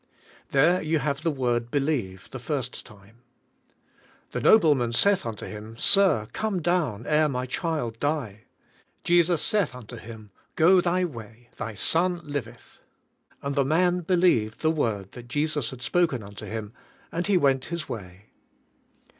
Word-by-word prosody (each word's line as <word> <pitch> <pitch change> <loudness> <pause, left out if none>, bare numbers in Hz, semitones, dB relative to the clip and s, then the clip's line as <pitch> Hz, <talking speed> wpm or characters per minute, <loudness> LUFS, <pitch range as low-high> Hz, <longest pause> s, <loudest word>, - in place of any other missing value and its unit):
There 170 +7 +3
you 160 +1 0
have 140 0 -2
the 165 - 0
word 120 -5 -1
"believe" 135 -10 -2
the - - -6
first - - -4
time. 105 +2 -18 1.1
"The - - -3
nobleman 145 - +4
saith 200 +2 +3
unto 110 -2 -6
Him, 110 +1 -9
Sir, 185 - +4
come 215 -4 -1
down 155 - -1
ere 155 0 +3
my 125 -2 -2
child 130 -5 -3
die. 135 -9 -2 0.6
Jesus 175 -1 +3
saith 210 - +1
unto 120 -1 -10
him. 110 -2 -11 0.2
Go 180 +3 +5
thy 180 +1 +1
way; 115 -5 -10
thy 115 -3 -5
son 175 - +2
liveth. 135 -6 -7 0.6
And 140 0 -2
the 140 0 +2
man 175 +5 +2
believed 170 - +1
the 155 - +3
word 110 - -2
that 120 -1 -11
Jesus 145 -1 -1
had 125 -1 -9
spoken 155 -7 +1
unto 100 0 -10
him, 110 -1 -6 0.4
and 170 +2 -2
he 200 -2 +4
went 135 -5 +2
his 170 0 -5
way." 100 -1 -9
140 Hz, 150 wpm, -26 LUFS, 115-170 Hz, 1.1 s, Go